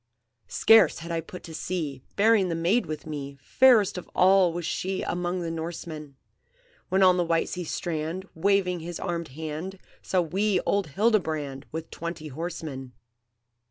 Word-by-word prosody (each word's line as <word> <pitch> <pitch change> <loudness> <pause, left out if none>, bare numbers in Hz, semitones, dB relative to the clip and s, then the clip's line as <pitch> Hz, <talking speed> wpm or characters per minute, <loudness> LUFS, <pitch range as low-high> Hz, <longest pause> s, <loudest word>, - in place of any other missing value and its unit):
"Scarce 220 - +5
had 170 0 -7
I 165 -1 -1
put 180 +3 -10
to 165 - -9
sea, 155 -6 -3
Bearing 205 -2 +4
the 165 - -1
maid 175 +9 +1
with 155 -1 -5
me, 140 -3 -6
Fairest 215 - +4
of - - -13
all 185 -1 +5
was 170 0 -4
she 190 +2 -2
Among 175 +1 -2
the 165 -1 -3
Norsemen! 160 -3 -6 0.7
When 190 +1 +3
on 185 -1 +6
the 175 - +2
white 165 -1 +1
sea 180 -1 -4
strand, 165 +3 -3
Waving 180 0 +1
his 170 +1 -6
armed 170 -2 -3
hand, 160 +6 -6 0.2
Saw 185 - +1
we 190 +4 +1
old 200 -3 0
Hildebrand, 155 -7 0
With 160 +1 -6
twenty 170 -2 -6
horsemen. 150 -4 -6
170 Hz, 160 wpm, -26 LUFS, 155-190 Hz, 0.7 s, on